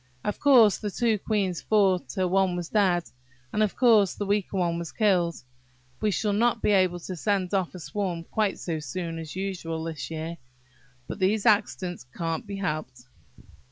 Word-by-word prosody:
Of 210 - -3
course 245 -8 +6
the 210 - -3
two 225 +1 +1
queens 195 -5 -1
fought 190 - +2
till 185 +5 -1
one 190 -1 +2
was 175 -1 -4
dead; 185 -5 +2 0.5
and, 215 - +1
of 210 -2 +1
course, 220 -6 +4
the 205 - -3
weaker 200 -1 0
one 170 -2 0
was 170 - -6
killed. 180 -6 +2 0.7
We 215 - +2
shall 205 +1 0
not 235 +2 +2
be 210 - +1
able 185 -3 +3
to 185 - -6
send 195 +1 -1
off 190 -2 0
a - - -7
swarm 175 -1 -3
quite 210 +3 -1
so 165 -3 -3
soon 165 +2 -5
as 160 0 -8
usual 175 -4 -4
this 160 -3 -5
year; 165 +1 -5 0.7
but - - -6
these 200 +2 +1
accidents 205 - +1
can't 165 +3 -3
be 200 - -5
helped." 150 -9 -4
190 Hz, 180 wpm, -26 LUFS, 170-210 Hz, 0.7 s, course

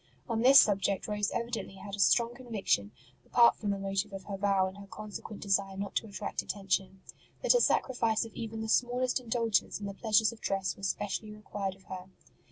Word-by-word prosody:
On 230 -2 -1
this 265 +3 +9
subject 200 -3 +2
Rose 210 -1 0
evidently 235 -4 -4
had 200 +1 -10
a - - -12
strong 235 +4 +4
conviction, 220 - -1 0.3
apart 235 -1 +5
from 210 - -4
the 200 - 0
motive 195 +1 -2
of 195 -1 -6
her 200 - -5
vow 195 -1 +2
and 190 +2 -9
her 200 - -11
con 215 +2 -9
sequent 210 +1 -7
desire 195 -1 0
not 200 0 -4
to 225 - -2
attract 200 - -4
attention, 195 -1 -2 0.4
that - - +6
a - - +4
sacrifice 230 - +2
of 225 - -11
even 225 -1 -5
the 220 - -3
smallest 245 +3 +1
indulgence 230 -5 0
in 205 - -6
the 200 - -4
pleasures 215 +1 +3
of 230 - -14
dress 195 -1 -1
was 195 -1 -2
specially 205 +2 -3
required 205 -2 -5
of 195 - -22
her. 185 -1 -8
205 Hz, 205 wpm, -30 LUFS, 195-230 Hz, 0.4 s, this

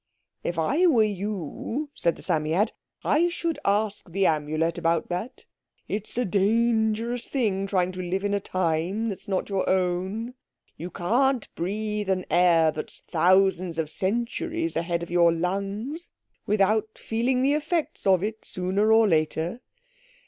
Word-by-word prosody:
"If 175 - -3
I 290 - +3
were 245 -10 +5
you," 210 - -3
said 170 -1 0
the - - -13
Psammead, 160 +8 +1 0.3
"I 325 +4 +3
should 340 -1 -2
ask 205 -1 0
the 195 +3 +1
Amulet 155 +2 0
about 165 -1 0
that. 230 - -5 0.4
It's 215 +2 -4
a 245 - +1
dangerous 225 +3 +1
thing, 200 -7 0
trying 185 -2 +1
to 185 0 -6
live 185 +2 -2
in 205 0 0
a 200 - +2
time 185 +4 -1
that's 200 +1 -7
not 190 -2 -1
your 195 -2 -1
own. 190 +6 0 0.4
You 170 +3 -6
can't 245 +8 +1
breathe 210 +2 -3
an 185 -1 0
air 170 -3 +5
that's 155 - -7
thousands 185 0 +2
of 160 -2 -2
centuries 240 - -2
ahead 170 0 -1
of 170 - -8
your 170 -1 +5
lungs 200 - -3 0.4
without 215 +2 +1
feeling 250 +3 0
the 280 +2 +3
effects 310 - -1
of 185 -1 +4
it, 220 +1 -4
sooner 190 +4 0
or 225 0 +6
later. 160 +5 0
195 Hz, 150 wpm, -26 LUFS, 175-225 Hz, 0.4 s, or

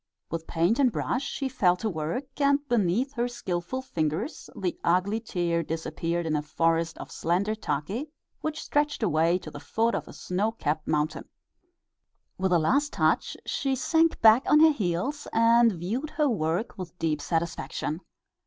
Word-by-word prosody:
With 165 0 -4
paint 175 +9 +1
and 260 -3 +4
brush 250 - -1
she 275 0 -3
fell 195 -9 +3
to 220 - -2
work, 215 - -4
and 280 +1 +3
beneath 235 +3 +1
her 240 -2 0
skilful 240 +1 -4
fingers 160 - -3
the 180 -3 -2
ugly 185 +5 +2
tear 175 -6 -1
disappeared 165 +1 -3
in 155 -1 0
a 150 - +1
forest 165 +2 0
of - - -9
slender 185 +6 0
take 210 - -3 0.3
which 310 0 -4
stretched 295 -3 0
away 165 -1 +3
to 160 -4 -9
the 145 - -8
foot 225 +9 0
of - - -3
a - - -10
snow 205 +5 -1
capped 155 -7 -2
mountain. 150 0 -1 1.1
With 190 0 +1
a 175 - +5
last 280 - +2
touch - - +1
she 270 -1 -1
sank 325 +5 +2
back 225 +2 +8
on 300 - +6
her 320 0 +8
heels 210 - -2
and 230 +1 +5
viewed 210 - -3
her 300 -1 +1
work 190 - -1
with 180 -1 -7
deep 155 -3 -1
satisfaction. 160 0 -2
190 Hz, 165 wpm, -27 LUFS, 165-255 Hz, 1.1 s, back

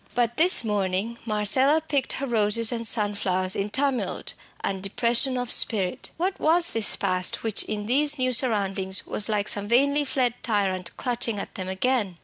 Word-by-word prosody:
But 240 -1 -1
this 345 -4 +8
morning 205 +1 -2
Marcella 260 +8 +2
picked 290 -4 -2
her 275 - -4
roses 225 -1 +2
and 230 -1 0
sunflowers 200 -4 0
in 200 +1 -3
tumult 270 +3 -1 0.3
and 195 -1 -4
depression 235 +6 +2
of 245 -1 -4
spirit. 190 -6 0
What 370 +4 -3
was 340 +2 +3
this 225 -2 0
past 185 -2 -2
which 220 -3 0
in 210 -1 -5
these 290 +6 +2
new 255 -1 -1
surroundings 195 -6 0
was 210 - +1
like 210 -1 -1
some 205 0 -1
vainly 280 +5 +2
fled 255 -3 -1
tyrant 195 -5 -2
clutching 240 -3 -2
at 200 - -7
them 185 -1 -6
again? 195 -2 -2
225 Hz, 165 wpm, -24 LUFS, 200-255 Hz, 0.3 s, this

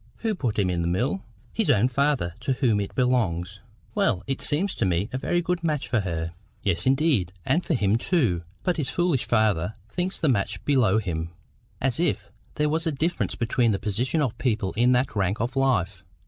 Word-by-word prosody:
"Who 220 - +2
put 125 - -2
him 95 -3 +2
in 85 -1 -1
the 85 - -1
mill?" 120 - 0 0.3
"His 225 - 0
own 105 +4 +4
father, 135 - +1
to 135 - 0
whom 125 -6 +2
it 100 - -4
belongs." 100 -8 0 0.3
"Well, 120 - +1
it 135 - -3
seems 185 +7 +1
to - - -2
me 90 +4 0
a 130 - -1
very 175 +5 0
good 175 0 -1
match 155 -4 -1
for 120 - +1
her." 85 -4 -3 0.3
"Yes, 90 0 +1
indeed, 135 - +2
and 175 - +2
for 165 - 0
him 105 -2 +2
too. 120 - +1 0.2
But 180 - 0
his 150 -4 -1
foolish 175 -7 +1
father 110 -4 +1
thinks 180 - -2
the 160 - 0
match 100 -7 0
below 120 -8 +3
him, 85 -6 -2 0.5
as 135 +2 0
if 105 - 0 0.2
there 150 - +1
was 160 +2 0
any 155 - -1
difference 165 +5 -1
between 120 -1 +1
the - - 0
positions 120 +10 0
of 125 -5 -1
people 110 -6 0
in 120 +3 +3
that 125 0 +1
rank 100 +1 0
of 120 +4 -2
life! 100 -8 +1
120 Hz, 205 wpm, -25 LUFS, 95-145 Hz, 0.5 s, own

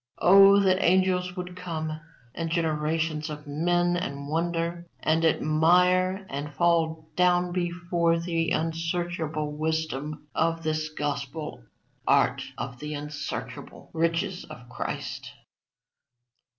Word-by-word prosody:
Oh 195 +2 +7
that 190 -1 +3
angels 180 0 +2
would 180 -1 -6
come, 160 -3 -4 0.3
and 165 -1 -3
generations 160 -1 -1
of 150 0 -7
men, 175 +4 +1
and 140 -5 -4
wonder, 170 +2 -2
and 160 +1 +2
admire, 180 +5 +3
and 145 0 -5
fall 160 -2 +1
down 180 0 +3
before 175 -1 0
the 165 -1 -1
unsearchable 165 -2 -2
wisdom 155 -1 -2
of 165 0 0
this 155 0 -1
gospel 145 - -4 0.4
art - - +3 0.2
of 125 -2 -5
the 150 0 -5
unsearchable 145 0 -6
riches 165 +2 0
of 120 0 -12
Christ!" - - -5
165 Hz, 110 wpm, -27 LUFS, 155-175 Hz, 0.4 s, Oh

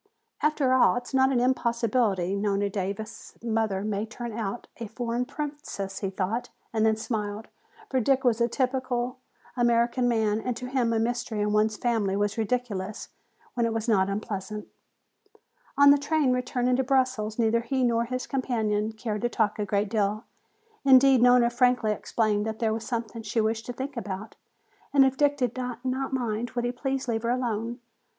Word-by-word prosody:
"After 295 -4 +2
all, 260 - +5
it 245 - -2
is - - -11
not 265 0 +4
an 250 - +2
impossibility, 230 -6 +1
Nona 200 0 0
Davis' 200 +3 -5
mother 220 -4 0
may 210 -1 -1
turn 235 0 -6
out 220 0 -4
a 230 - -5
foreign 235 +2 -2
princess," 280 -9 -5
he 195 - -2
thought, 195 +5 -2 0.2
and 220 -1 +1
then 220 0 +4
smiled. 215 -1 -4 0.4
For 260 - +2
Dick 265 +2 +2
was 240 -2 +2
a 235 - +4
typical 255 0 -1 0.4
American 240 0 +2
man 220 -2 +1
and 245 0 -3
to 250 - -6
him 250 -2 0
a 225 - +1
mystery 235 -1 -1
in 210 0 0
one's 215 0 +2
family 220 -5 0
was 205 0 0
ridiculous 215 -4 -2 0.4
when 235 -1 +1
it 225 - -2
was 225 +1 -2
not 195 -4 +3
unpleasant. 210 0 -4 1.1
On 285 0 +8
the 285 - +5
train 285 -2 +2
returning 250 0 0
to 265 - +2
Brussels 255 -5 0
neither 230 0 +2
he 260 +2 -1
nor 235 -1 +2
his 255 +1 -3
companion 220 -5 -1
cared 220 -2 -4
to 240 - +1
talk 215 -2 0
a 210 - 0
great 200 0 0
deal. 210 0 0 0.6
Indeed, 265 -2 +6
Nona 245 -1 +5
frankly 245 -2 +2
explained 210 -1 0
that 220 0 -3
there 220 -2 0
was 225 0 -4
something 230 -2 -3
she 225 +1 -2
wished 220 +1 0
to 245 - -4
think 265 +3 -5
about, 210 -1 -6 0.6
and 275 -2 +6
if 265 0 +1
Dick 290 0 +2
did 250 -4 -1
not 250 -1 -5 0.3
mind, 240 -2 -2
would 240 -1 0
he 245 - 0
please 270 +1 -3
leave 225 -2 0
her 235 - -1
alone. 235 -1 -1
235 Hz, 180 wpm, -27 LUFS, 215-250 Hz, 1.1 s, On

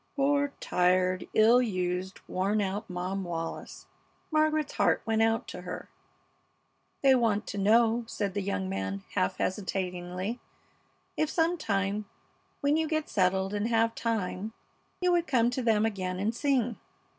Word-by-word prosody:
Poor, 285 0 +2
tired, 185 0 +2
ill 230 +3 +6
used, 185 -4 -2
worn 195 +3 0
out 205 +2 -2
Mom 185 +2 -3
Wallis! 165 -2 -5 0.5
Margaret's 310 -1 +2
heart - - +2
went 225 0 +1
out 225 0 +2
to - - -7
her. - - -7 1.1
"They 270 -1 +7
want 225 -4 +2
to 205 - -4
know," 225 +3 +4
said 200 -4 -2
the 205 - -1
young 95 - -2
man, 95 0 -3
half 95 - 0
hesitatingly, 185 +2 -3 0.8
"if 310 - 0
some 330 +1 +2
time, 205 - -1 0.6
when 285 +2 +3
you 320 0 +1
get 310 -1 -1
settled 190 0 +1
and 205 +1 0
have 230 -1 +2
time, 220 -2 -2 0.5
you 360 0 +3
would 345 -1 +2
come 240 -3 +3
to 255 - -2
them 220 -3 +3
again 185 -4 -2
and 210 +4 0
sing? 245 -3 0
215 Hz, 145 wpm, -29 LUFS, 185-245 Hz, 1.1 s, They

